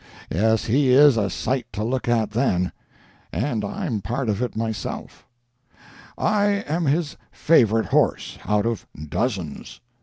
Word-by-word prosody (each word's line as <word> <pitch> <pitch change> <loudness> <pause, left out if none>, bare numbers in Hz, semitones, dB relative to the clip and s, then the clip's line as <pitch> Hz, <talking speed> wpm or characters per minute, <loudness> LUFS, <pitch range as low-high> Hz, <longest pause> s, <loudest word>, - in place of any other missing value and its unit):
Yes, 110 +5 +2
he 135 +4 +2
is 140 +1 +7
a 100 -3 0
sight 120 +5 -2
to 105 - -3
look 125 +3 -2
at 110 -3 +1
then—and 110 - -3
I'm 120 - -3
part 120 +5 -2
of 105 +2 -1
it 125 -3 -2
myself. 110 -1 -5 0.9
I 210 -1 +2 0.2
am 165 +3 -1
his 150 +2 0
favorite 115 -8 +3
horse, - - 0
out 105 +2 +1
of 115 -2 -2 0.2
dozens. 95 - -3
115 Hz, 130 wpm, -23 LUFS, 105-135 Hz, 0.9 s, is